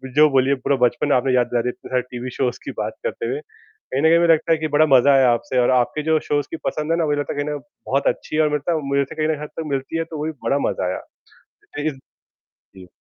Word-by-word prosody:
जो 155 0 +7
बोलिए 135 +1 +3
पूरा 135 +2 0
बचपन 145 +4 0
आपने 130 +1 +2
याद 120 -1 +3
दिलाया 120 0 0
इतने - - -10
सारे 125 -1 +1
टीवी 125 +1 -5
शोज़ 125 -2 -1
की - - -4
बात - - -2
करते 485 -1 -3
हुए 425 - -2
कहीं 435 - -8
न - - +2
कहीं 170 +1 +5
मुझे 170 -1 +5
लगता 160 +1 0
है - - +2
कि 155 - -1
बड़ा 155 +1 +6
मज़ा 140 +3 +5
आया 130 -2 +5
आपसे 125 +2 0
और 120 - +3
आपके 150 +5 -1
जो 160 0 +2
शोज़ 145 -1 +1
की 165 - -4
पसंद 155 +1 -2
है 165 - +2
ना 165 - +1
मुझे 145 -1 0
लगता 145 - -3
कहीं 145 0 -2
ना - - -2 0.3
बहुत 140 +1 +1
अच्छी - - -8
है 155 - +3
और 150 - +2
मुझे 150 - +1
लगता 165 +3 -1
मुझे 140 0 +2
लगता 140 - -5
है 155 - +2
कहीं 155 -2 0
ना - - -11
हद - - -7
तक - - -2
मिलती 135 +4 -2
है 165 - 0
तो 160 -1 -8
वो 150 - -3
भी 160 - -2
बड़ा 140 - +1
मज़ा - - -2
आया 90 - -2 0.8
लेकिन 145 -2 -2 0.8
जी। 90 -1 -12
145 Hz, 280 wpm, -21 LUFS, 130-160 Hz, 0.8 s, जो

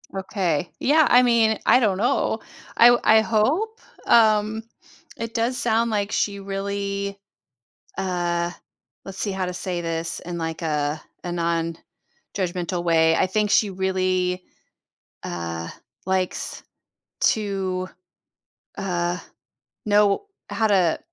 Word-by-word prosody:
Okay. 185 -4 -1
Yeah, 305 +3 +4
I 250 +1 +7
mean, 230 -2 +3
I 250 - +6
don't 200 -6 +2
know. 220 0 +1 0.4
I 235 - +8
w 240 0 +5
I 220 0 +6
hope? 300 - 0 0.3
Um, 220 -1 +4 0.5
it 230 0 -5
does 240 +2 0
sound 230 -3 +1
like 205 -1 -1
she 200 -1 0
really 200 0 -3 0.8
uh, 175 -2 -1 0.5
let's 195 -1 -8
see 205 - -1
how 190 -1 -2
to 180 - -4
say 180 -1 -3
this 165 0 -3
in, 175 0 -6
like, 165 0 -4
a 150 -1 -1 0.2
a 175 - -4
nonjudgmental 170 +1 -4
way. 165 -1 +4
I - - +3
think 210 +2 0
she 210 - +4
really, 185 -1 0 0.8
uh, 85 -1 -4 0.4
likes 190 -1 -2 0.6
to, 195 -3 0 0.9
uh, 175 -2 -1 0.7
know 205 - +3 0.2
how 220 - +1
to, 185 -5 +2
190 Hz, 120 wpm, -23 LUFS, 175-215 Hz, 0.9 s, I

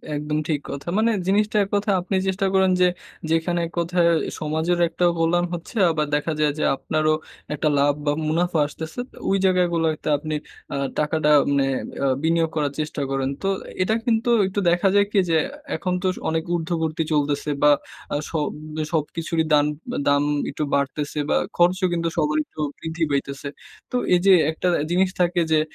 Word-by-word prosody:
একদম 150 +1 -2
ঠিক 150 -3 0
কথা। 140 +3 -7
মানে 225 +2 +3 0.2
জিনিসটা 210 +2 +2
এক 195 - -6
কথায় 205 -1 +1
আপনি 185 +2 -3
চেষ্টা 190 +1 0
করেন 190 -1 +4
যে, 180 - +6 0.4
যেখানে 165 +2 +1
এক - - -15
কথায় 170 0 +2 0.3
সমাজের 160 +3 0
একটা 175 +2 0
কল্যাণ 175 +2 +2
হচ্ছে, 175 +7 -6
আবার 155 -2 0
দেখা 150 +3 -1
যায় 150 -1 +3
যে, - - 0
আপনারও 155 +2 0 0.4
একটা 150 +1 -1
লাভ 145 +1 +4
বা 145 - +3 0.2
মুনাফা 170 +1 +1
আসতেছে, 160 +6 -8 0.3
ওই 195 - +3
জায়গাগুলোতে 170 -4 +1
আপনি 155 +2 -5 0.4
আ - - -2 0.2
টাকাটা 150 0 +1 0.2
মানে 140 -1 +2 0.4
আ - - +3 0.2
বিনিয়োগ 165 0 +2
করার 145 -2 0
চেষ্টা 150 -1 -3
করেন। 135 -1 0
তো 195 - -1 0.3
এটা 215 +4 +2
কিন্তু 235 0 +1 0.2
একটু 190 +2 -2
দেখা 175 +3 +2
যায় 200 0 +5
কি? 205 - +3
যে, 165 - +3 0.4
এখন 180 -2 -2
তো - - +2
স - - -13
অনেক 160 0 0
ঊর্ধ্ববর্তী 160 -1 -1
চলতেছে 145 0 0
বা 150 - +7 0.4
আ - - +1 0.2
সব 155 -3 0 0.4
সবকিছুরই 160 +1 -1
দান 145 -1 +5 0.4
দাম 145 0 +4 0.3
একটু 150 - -3
বাড়তেছে 145 +2 -2
বা - - +3 0.2
খরচও 180 +2 +3
কিন্তু 170 -1 0
সবার 150 -1 +1
একটু - - -16 0.2
বৃদ্ধি 160 +1 -3
পাইতেছে। 140 0 -2 0.4
তো - - -3 0.2
এই 180 - +5
যে 195 - +8 0.2
একটা 160 +3 -2 0.2
জিনিস 185 +2 +3
থাকে 175 0 +2
যে, 155 - +5
165 Hz, 175 wpm, -23 LUFS, 150-180 Hz, 0.4 s, যে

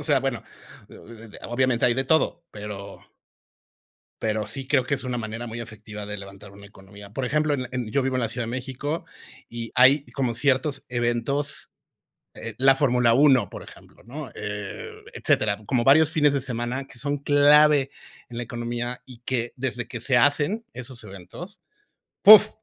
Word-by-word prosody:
O - - -8
sea, 145 -3 +3
bueno, 135 -3 -2 1.1
obviamente 125 0 +2
hay 120 - +3
de 135 +2 -1
todo, 160 +4 +1
pero, 105 -1 -8 1.2
pero 110 -1 -1
sí 130 +5 -6
creo 130 -4 +3
que 140 - 0
es 130 - -6
una 125 -1 -2
manera 115 +2 -5
muy 115 +1 -6
efectiva 105 -2 -8
de 105 - -5
levantar 100 0 -11
una 100 0 -13
economía. 100 0 -14
Por 130 - -3
ejemplo, 150 +2 +1
en, 130 -3 -3
en 125 -4 -3
yo 140 - +1
vivo 130 0 -1
en - - 0
la 115 - 0
Ciudad 120 +2 -4
de - - -5
México, 130 +5 -4 0.4
y 115 -1 -7
hay 135 +3 +6
como 125 -4 -1
ciertos 135 +2 0
eventos, 120 +4 -2 0.7
eh, - - -7
La 135 +1 +5
Fórmula 125 -4 +3
1, 130 -6 +4
por - - -9
ejemplo, - - -16
¿no? 135 +3 -7
Eh, 105 -1 -6 0.2
etcétera. 105 -1 +1
Como 125 -1 +1
varios 150 +4 +5
fines 150 -3 +3
de 140 - 0
semana 125 +1 -3
que 120 - -14
son 145 0 -2
clave 145 0 +5 0.4
en 120 - -8
la 120 - -2
economía, 120 +1 -4
y 125 -3 -13
que 120 -2 -1
desde 125 -2 -3
que 120 - -6
se 130 +1 +2
hacen 145 - +2
esos 125 -1 -9
eventos, 105 - -10 0.6
¡puf! 215 +1 +10
125 Hz, 175 wpm, -24 LUFS, 115-140 Hz, 1.2 s, puf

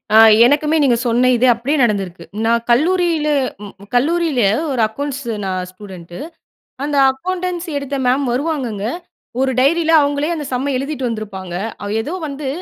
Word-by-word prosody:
அ - - +7 0.3
எனக்குமே 300 +3 +2
நீங்க 245 -3 +3
சொன்ன 245 +2 +3
இது 255 +2 +2
அப்படியே 255 +6 -1
நடந்திருக்கு. 195 -6 -1 0.2
நான் 235 0 +2
கல்லூரியில 330 +3 +2 0.7
கல்லூரியில 310 +1 +1 0.3
ஒரு 250 - -1
அக்கவுண்ட்ஸ் 280 +5 -5 0.2
நான் 185 -1 -2
ஸ்டூடண்ட் 185 -3 -12 0.7
அந்த 290 0 -1
அக்கவுண்டன்சி 360 +3 -4
எடுத்த 280 0 -5
மேம் 265 +3 +2
வருவாங்கங்க, 255 -7 -2 0.6
ஒரு 265 0 +1
டைரியில 325 +4 +2
அவங்களே 285 +3 0
அந்த 300 -3 -5
சம்ம 275 +3 -1
எழுதிட்டு 275 -1 -3
வந்திருப்பாங்க, 195 -5 -6 0.5
ஏதோ 295 +9 -5
வந்து, 280 0 -6
270 Hz, 135 wpm, -18 LUFS, 230-305 Hz, 0.7 s, அ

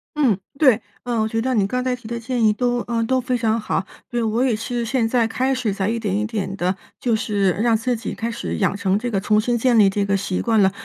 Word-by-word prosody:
嗯， 265 -10 +3 0.2
对。 260 -8 +5 0.3
呃， 240 -2 -1
我 220 - +1
觉 225 +1 -1
得 260 +2 0
你 205 -5 +2
刚 250 +4 -1
才 255 0 0
提 250 -3 -8
的 235 +1 -3
建 235 0 -1
议 215 - +5
都 245 +3 0
呃， 230 -1 0
都 260 +3 +1
非 250 0 -1
常 225 -1 +1
好。 195 -3 -2 0.2
对， 240 -1 -1
我 225 +2 0
也 245 -4 +2
是 235 +2 -3
现 235 -1 0
在 235 -1 +2
开 260 +4 0
始 245 -6 -1
在 195 0 -1
一 230 +1 -1
点 205 -3 -1
一 210 - 0
点 210 -3 -3
的 185 0 -1 0.2
就 240 - 0
是 205 -3 +1
让 225 +6 +2
自 245 +3 0
己 220 - -5
开 230 +1 -3
始 85 - -4
养 85 - +1
成 195 -1 +1
这 240 +3 -3
个 195 - +1
重 210 +2 +2
新 240 +2 0
建 240 0 +3
立 205 -3 +6
这 200 +1 0
个 200 0 +1
习 190 -1 -1
惯 225 -3 +2
了。 190 -1 +4
225 Hz, 295 characters per minute, -21 LUFS, 205-245 Hz, 0.3 s, 立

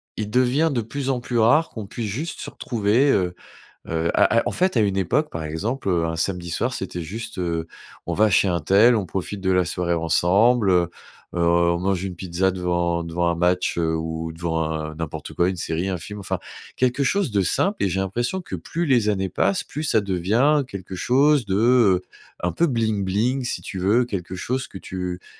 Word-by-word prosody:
il 105 -1 -4
devient 130 +7 +2
de 120 -4 0
plus 135 +4 -4
en 130 - +1
plus 120 -1 -2
rare 145 +9 +4
qu'on 110 -4 -7
puisse 115 0 -4
juste 145 +11 -4
se - - -5
retrouver, 115 +4 +1
heu 90 -5 +1 0.6
heu, 80 +1 0
à 115 - +4
à, - - +3
en - - -3
fait, 185 -6 +1
à - - +5
une 100 -2 +1
époque, 125 - +1
par 80 - -5
exemple, 100 - -3
heu, 85 -2 +1
un 80 - -3
samedi 85 +1 -2
soir, 120 +9 -1
c'était 90 -6 -4
juste, 100 +4 -7
heu, 85 -2 -2 0.4
on - - -2
va 110 +1 +3
chez 95 +1 +4
untel, 100 +8 +4
on 105 - -1
profite 95 +3 -5
de 95 - +1
la 90 -2 +3
soirée 85 0 -1
ensemble, 95 +7 +3
heu 85 -1 +3 0.4
heu, 90 - -2
on 85 0 +3
mange 95 0 0
une 90 -3 -5
pizza 95 +1 0
devant 85 -2 -1
devant 85 +1 -1
un 85 - +1
match, 90 +1 +1
heu, 80 -1 +1
ou 80 0 -4
devant 80 -1 -2
un 80 0 -4
n'importe 80 -1 -6
quoi, 90 +2 +2
une 95 - -4
série, 85 +2 -2
un 90 - -2
film, 105 +4 -8
enfin, 95 - -3 0.4
quelque 130 +2 +1
chose 200 0 +1
de 100 -2 +2
simple, 195 - +1
et 100 - +2
j'ai 95 +2 -1
l'impression 120 - -2
que, 180 - -6
plus 170 +1 -3
les 120 -7 +3
années 95 -2 -1
passent, 100 +2 +1
plus 150 - -6
ça 110 -7 +3
devient 110 - +2
quelque 95 -3 -8
chose 135 +6 +3
de, 95 -1 -2
heu, 110 -4 +4 0.4
un 90 0 0
peu 170 - +2
bling 110 -6 0
bling, 120 +8 0
si - - -2
tu 95 - -6
veux, 110 +7 +2
quelque 95 -5 -5
chose 130 +7 -2
que 95 - -9
tu 90 -1 -5
t - - -25
95 Hz, 215 wpm, -23 LUFS, 85-120 Hz, 0.6 s, à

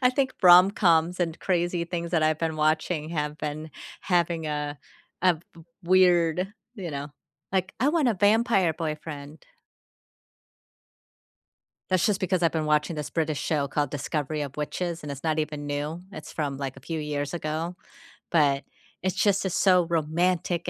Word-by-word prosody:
I 250 - +5
think 265 0 0
rom-coms 180 -1 +6
and 165 -2 -1
crazy 175 -1 0
things 170 -1 -4
that 160 - +3
I've 155 0 +2
been 160 -1 -2
watching 155 +1 0
have 150 -2 -2
been 155 +1 -5 0.3
having 170 -3 0
a 150 -1 -3 0.4
a 180 -2 +5 0.2
w 165 - -14 0.2
weird, 180 0 +3 0.2
you 190 -7 -5
know 140 0 -5 0.4
like, 190 0 0
"I 265 - +4
want 305 -4 +2
a 230 - +2
vampire 205 -3 +3
boyfriend." 155 -2 -6 2.5
That's 185 +2 +3
just 205 -2 +1
because 185 -1 0
I've 165 - +3
been 160 -2 -1
watching 150 +2 +1
this 150 -2 -5
British 155 -3 -1
show 150 -3 0
called 145 0 -1
Discovery 150 +1 -2
of 140 0 -6
Witches, 170 +3 -3
and 150 - -6
it's 140 +1 -7
not 160 -1 +1
even 150 -1 -4
new, 145 +3 -3
it's 155 - -9
from, 145 -3 -2
like, 135 -1 -5
a - - -12
few 160 +4 -4
years 145 0 -3
ago, 160 +2 -3 0.6
but, 140 -4 +3 0.4
it's 185 -1 0
just 200 -1 +2
it's 180 - -2
so 180 -3 +4
romantic 170 +2 0
165 Hz, 160 wpm, -26 LUFS, 150-180 Hz, 2.5 s, rom-coms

